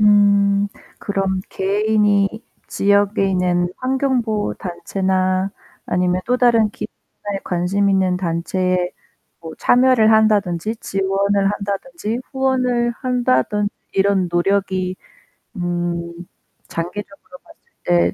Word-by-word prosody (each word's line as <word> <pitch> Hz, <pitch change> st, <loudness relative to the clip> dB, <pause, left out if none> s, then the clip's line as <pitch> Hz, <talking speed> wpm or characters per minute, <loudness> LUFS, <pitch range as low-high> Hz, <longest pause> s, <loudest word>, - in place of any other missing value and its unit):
음 205 Hz, -1 st, +4 dB, 0.3 s
그럼 195 Hz, -2 st, -1 dB
개인이 205 Hz, 0 st, +2 dB, 0.4 s
지역에 200 Hz, 0 st, +2 dB
있는 180 Hz, -1 st, +1 dB
환경보호단체나 200 Hz, -7 st, -1 dB, 0.4 s
아니면 180 Hz, 0 st, +1 dB
또 250 Hz, -, +2 dB
다른 230 Hz, -4 st, +4 dB
기업에 205 Hz, -1 st, -7 dB
관심있는 190 Hz, +1 st, +1 dB
단체에 180 Hz, +1 st, -1 dB, 0.5 s
뭐 160 Hz, -1 st, -8 dB
참여를 250 Hz, -3 st, +4 dB
한다든지 210 Hz, -2 st, +2 dB
지원을 195 Hz, 0 st, 0 dB
한다든지 210 Hz, -, -4 dB
후원을 255 Hz, -3 st, +1 dB
한다든지 210 Hz, -, +1 dB, 0.2 s
이런 195 Hz, -2 st, +2 dB
노력이 185 Hz, 0 st, 0 dB, 0.6 s
음 175 Hz, -1 st, -2 dB, 0.6 s
장기적으로 180 Hz, +2 st, -7 dB
봤을 330 Hz, 0 st, -20 dB, 0.2 s
때 175 Hz, -1 st, +2 dB
200 Hz, 230 characters per minute, -19 LUFS, 185-215 Hz, 0.6 s, 음